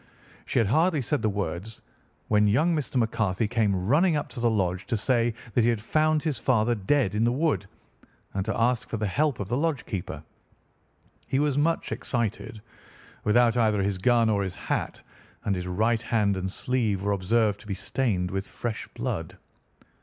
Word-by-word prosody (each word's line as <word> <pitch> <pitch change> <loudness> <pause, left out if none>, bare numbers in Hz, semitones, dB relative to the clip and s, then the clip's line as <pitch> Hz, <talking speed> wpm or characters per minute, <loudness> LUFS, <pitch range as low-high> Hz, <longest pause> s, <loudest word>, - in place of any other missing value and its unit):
She - - -1
had 115 - +4
hardly 155 - +2
said 145 +2 -1
the 110 - +1
words 100 +1 -4 0.5
when 105 -1 +3
young 155 +11 +3
Mr. 150 -3 -3
McCarthy 110 -4 +1
came 100 -5 0
running 160 - +4
up 150 - -2
to 125 - -7
the 120 0 +2
lodge 95 -4 -1
to 115 - 0
say 115 +2 +1 0.2
that 120 - +3
he 115 - +3
had 115 -2 +1
found 155 +7 +1
his 155 -4 -1
father 120 -2 +2
dead 110 +1 +1
in 105 +1 +1
the 120 - +3
wood, 140 -6 0 0.7
and 95 - -1
to 110 - -1
ask 120 0 +1
for 115 - -2
the 105 - -1
help 145 +7 0
of 100 - -3
the 120 +4 -1
lodge 155 -3 -1
keeper. 95 -5 -5 1.0
He 130 - 0
was 145 -1 +1
much 160 +3 0
excited, 115 -2 -3 0.6
without 115 +2 +4
either 110 -4 +2
his 100 -1 -1
gun 115 +3 +3
or 105 -2 +2
his 95 -2 -3
hat, - - -3 0.5
and 100 - +1
his 90 -1 -3
right 110 +5 +1
hand 105 -4 +1
and 95 0 -3
sleeve 110 -5 -1
were 100 - +1
observed 105 +2 +1
to - - -14
be 100 - -2
stained 100 -4 -1
with 95 +1 -3
fresh 115 -3 -5
blood. - - -4
115 Hz, 190 wpm, -26 LUFS, 100-125 Hz, 1.0 s, had